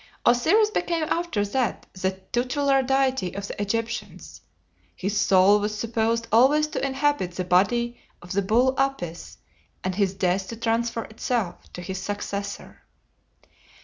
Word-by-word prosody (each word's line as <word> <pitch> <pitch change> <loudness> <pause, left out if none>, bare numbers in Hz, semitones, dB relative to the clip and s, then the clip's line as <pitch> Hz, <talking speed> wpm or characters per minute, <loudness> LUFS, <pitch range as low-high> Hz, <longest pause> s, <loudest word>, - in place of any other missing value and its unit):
Osiris 380 - +4
became 340 -5 0
after 335 -12 0
that 250 +4 -1
the 190 0 -1 0.2
tutelar 270 +3 +2
deity 265 -7 0
of 200 0 -4
the - - -6
Egyptians. 230 +3 -4 0.5
His 195 +2 -3
soul 200 0 +5
was 210 +1 -2
supposed 230 +1 0
always 270 +7 +5
to - - -3
inhabit 275 -8 0
the 185 - -3
body 235 +7 +2 0.2
of 175 - -12
the 200 - +1
bull 240 +7 +3
Apis, 180 -12 -2 0.5
and 185 - -1
at 190 - -6
his 195 -2 +1
death 190 0 0
to 230 - -6
transfer 230 0 -1
itself 220 -3 -3
to 180 - -7
his 190 +2 -5
successor. 200 0 -5
225 Hz, 145 wpm, -25 LUFS, 195-260 Hz, 0.5 s, soul